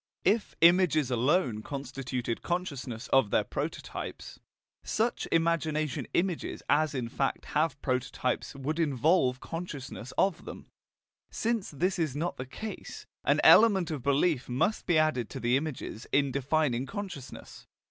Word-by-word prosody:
If 210 +3 +1
images 165 -5 +5
alone 125 - +2
constituted 130 -3 -4
consciousness 140 -9 -3
of 135 -6 +4
their - - +2
prototypes, - - -5 0.4
such 230 +2 -1
imagination 155 -3 0
images 180 -1 -1
as 155 -1 +2
in 125 -3 -2
fact 135 +3 -2
have 150 -2 +1
prototypes 125 0 -1
would 145 +4 -3
involve 140 -2 +2
consciousness 145 -7 -6
of 195 -4 +1
them; - - -9 0.6
since 230 -3 -1
this 180 +6 -1
is 155 -5 0
not 165 +4 -2
the 130 - -6
case, 215 +11 -7 0.2
an - - +3
element 195 -7 +6
of 150 -4 -3
belief 140 +1 +1
must 130 - 0
be 175 -3 +4
added 155 -7 +1
to - - -6
the 120 +2 +2
images 140 -6 -4
in 140 -1 +3
defining 135 -2 0
consciousness. 190 - -8
145 Hz, 135 wpm, -29 LUFS, 130-170 Hz, 0.6 s, element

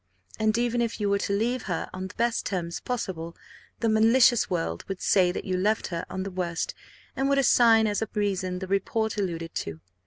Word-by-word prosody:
And, 215 +1 +2
even 240 0 +1
if 230 -1 -2
you 205 -1 0
were 200 - +2
to 200 - -1
leave 240 +3 -1
her 180 - -2
on 185 0 -4
the 190 - -13
best 235 0 0
terms 170 -3 -3
possible, 175 -9 -4 0.4
the 230 - +2
malicious 230 +2 +4
world 170 -3 -2
would 195 -2 -4
say 180 -2 +3
that - - -5
you 185 - -1
left 210 +4 +1
her 170 -2 -4
on 190 - -3
the 195 - -5
worst, 175 -2 -2 0.4
and 270 +1 0
would 280 - +3
assign 235 -4 +5
as 210 0 0
a 220 - -2
reason 190 -3 -1
the 190 +1 -5
report 215 +3 0
alluded 165 -4 -3
to. 80 -1 -4
200 Hz, 210 wpm, -26 LUFS, 180-225 Hz, 0.4 s, assign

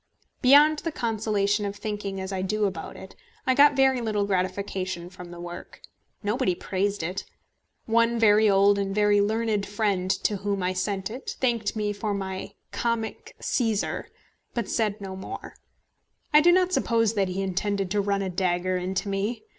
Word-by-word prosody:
Beyond 295 +4 +6
the 330 - -3
consolation 210 -4 0
of 200 0 -3
thinking 205 -2 -4
as 190 +1 -4
I 190 - -2
do 210 +3 0
about 180 -5 -4
it, 190 - -11 0.3
I 260 - +3
got 285 +2 +6
very 265 -2 +3
little 210 -3 0
gratification 185 -2 -2
from 180 -1 -10
the 175 0 -10
work. 175 0 -9 0.4
Nobody 210 -2 +1
praised 200 +1 -2
it. 180 +4 -3 0.6
One 230 +1 +2
very 215 -1 +5
old 200 +1 +4
and 195 0 -2
very 210 -1 +4
learned 215 0 0
friend 205 -3 0
to 195 +2 0
whom 200 -1 -2
I 185 +1 0
sent 195 +1 -2
it 255 +4 -6
thanked 235 -5 0
me 210 -1 -1
for 205 0 -2
my 190 0 -5 0.2
"comic 230 -2 -3
Cæsar," 225 -5 -1 0.5
but 235 -4 -1
said 215 -2 0
no 190 -1 -6
more. 190 - -7 0.8
I 300 - +8
do 350 +3 +6
not 365 0 +3
suppose 230 - +2
that 200 -3 +1
he 185 +2 -2
intended 195 0 -1
to 205 0 +2
run 200 0 0
a 190 - -2
dagger 180 0 0
into 185 +3 -2
me. 200 +4 -2
205 Hz, 170 wpm, -26 LUFS, 190-225 Hz, 0.8 s, I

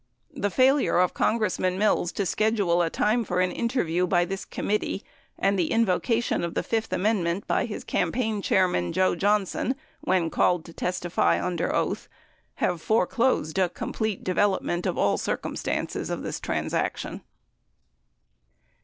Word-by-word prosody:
89 285 -3 -9
The 205 - +2
failure 265 +3 +3
of 180 0 +3
Congressman 185 -4 0
Mills 200 -4 +2
to 200 - -1
schedule 200 -4 +2
a 165 - +1
time 220 +7 +1
for 180 -4 -1
interview 180 -2 0
by 175 -1 +3
this 195 +1 -5
committee 210 -1 -2 0.3
and 195 0 +1
the 170 - +1
invocation 225 0 +1
of 170 - -3
the - - 0
fifth 225 -1 -2
amendment 190 -3 0
by - - +1
his - - -6
campaign 220 -5 -1
chairman, 180 - +1
Joe 185 0 +3
Johnson, 205 +7 +1 0.2
when 180 -3 +1
called 175 -2 +2
to 165 - -11
testify 170 - 0
under 90 +1 -1
oath, - - -1 0.5
have 175 -2 -1
foreclosed 220 -4 +1
a 185 -2 +3
complete 215 +3 -3
development 185 -2 0
of - - -2
all - - +2
circumstances - - -3
of - - -3
this - - -4
transaction. - - -2
190 Hz, 145 wpm, -26 LUFS, 175-220 Hz, 0.5 s, failure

